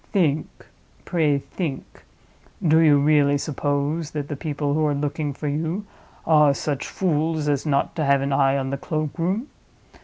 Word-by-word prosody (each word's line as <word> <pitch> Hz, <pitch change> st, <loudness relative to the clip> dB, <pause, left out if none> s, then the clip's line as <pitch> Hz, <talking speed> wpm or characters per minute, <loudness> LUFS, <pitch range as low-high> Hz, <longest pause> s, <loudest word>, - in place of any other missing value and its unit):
Think; 155 Hz, -6 st, +1 dB, 0.6 s
pray 155 Hz, -5 st, +2 dB
think! 140 Hz, 0 st, -6 dB, 0.6 s
Do 160 Hz, +1 st, +5 dB
you 155 Hz, -3 st, +6 dB
really 145 Hz, 0 st, +3 dB
suppose 145 Hz, +2 st, -2 dB
that 145 Hz, -2 st, -5 dB
the 150 Hz, -, -3 dB
people 145 Hz, -1 st, -2 dB
who 155 Hz, +1 st, +1 dB
are 145 Hz, -, 0 dB
looking 145 Hz, +1 st, -2 dB
for 150 Hz, +2 st, -5 dB
you 160 Hz, +7 st, -2 dB, 0.4 s
are 150 Hz, -3 st, +5 dB
such 140 Hz, -1 st, -3 dB
fools 160 Hz, -3 st, -1 dB
as 145 Hz, +1 st, 0 dB
not 140 Hz, -1 st, 0 dB
to 155 Hz, -, 0 dB
have 140 Hz, 0 st, +3 dB
an 140 Hz, 0 st, -1 dB
eye 135 Hz, 0 st, +3 dB
on 135 Hz, -1 st, -2 dB
the 140 Hz, -, -2 dB
cloakroom? 165 Hz, -, -2 dB
150 Hz, 160 wpm, -23 LUFS, 140-160 Hz, 0.6 s, you